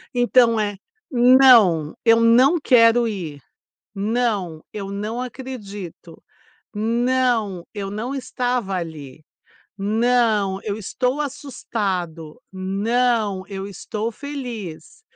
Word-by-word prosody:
Então 245 -2 +4
é, 205 -2 -2 0.3
"Não, 240 - +5
eu 230 -1 +5
não 250 +8 +5
quero 240 -3 +4
ir. 170 -9 -5 0.5
Não, 205 -6 -1
eu 200 -2 -5
não 210 +4 -4
acredito. 210 -10 -8 0.5
Não, 230 -4 0
eu 200 -2 -5
não 220 +6 -4
estava 245 -6 -2
ali. 155 -5 -7 0.5
Não, 215 -2 +1
eu 205 -1 -3
estou 250 +7 -2
assustado. 200 - -4
Não, 205 +1 0
eu 195 -1 -6
estou 210 +3 -5
feliz. 245 - -8
220 Hz, 95 wpm, -21 LUFS, 195-245 Hz, 0.5 s, Não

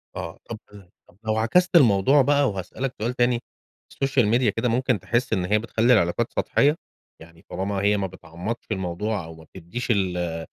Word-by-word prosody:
آه، 85 -2 -6
طَب 115 - -5 0.5
طَب، 90 - -23
لو 110 0 0
عكست 180 +12 +2
الموضوع 130 - +5
بقى 140 0 +3
وهاسألك 100 +7 -4
سؤال 120 +3 -1
تاني، 120 -1 +1 0.5
السوشيال 135 -4 +1
ميديا 120 +1 +3
كده 115 +4 -1
ممكن 125 -1 +1
تحس 120 +7 -1
إن 90 -4 0
هي 105 +3 +2
بتخلّي 115 +2 +2
العلاقات 105 +3 +1
سطحية؟ 145 +2 +2 0.5
يعني 85 0 -16
طالما 100 +2 -3
هي 105 +1 +2
ما 100 -1 -1
بتعمقش 95 +5 -7
الموضوع 95 +1 -2
أو 80 0 -10
ما 80 - -14
بتدّيش 95 +8 -4
ال 90 -5 -1
110 Hz, 170 wpm, -24 LUFS, 90-125 Hz, 0.5 s, الموضوع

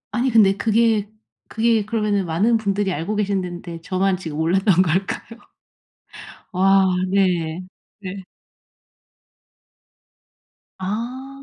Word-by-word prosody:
아니 250 +2 0
근데 210 -5 +5
그게 220 -2 +2 0.4
그게 225 -2 +1
그러면은 210 -3 0
많은 200 +8 +2
분들이 200 -2 -1
알고 170 +8 -3
계신 200 -2 0
덴데 175 -2 -7
저만 190 +2 0
지금 160 -5 -7
몰랐던 185 +3 +3
걸까요? 190 +6 -2 1.1
와 195 +1 +4 0.3
네. 180 -4 +1 0.4
네. 195 -1 -7 2.6
아. 235 +8 -4
195 Hz, 195 characters per minute, -21 LUFS, 185-215 Hz, 2.6 s, 근데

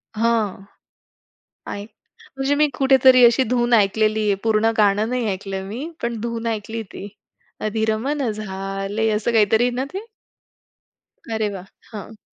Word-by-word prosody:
हां, 220 -3 0 1.1
आय 200 - -5 0.5
म्हणजे 270 +1 +1
मी 300 - +6
कुठेतरी 260 -2 +6
अशी 235 +3 +4
धून 240 -1 +1
ऐकलेली 215 +1 +2
आहे. 200 - +3
पूर्ण 220 0 +3
गाणं 210 +1 +3
नाही 250 -1 -1
ऐकलं 195 +1 -5
आहे 190 - -4
मी, 240 +12 -6
पण 235 -2 -2
धून 230 0 -4
ऐकली 225 0 -3
ती. 200 - -7 0.5
अधीर 220 0 0
मन 270 +2 -1
झाले, 195 +1 -3
असं 215 +2 0
काहीतरी 220 +1 +4
आहे 250 - +2
ना 255 +2 -1
ते? 385 - -3 1.4
अरे 220 -1 0
वाह! 195 -2 -8 0.3
हां. 215 +1 -8
220 Hz, 145 wpm, -21 LUFS, 205-240 Hz, 1.4 s, मी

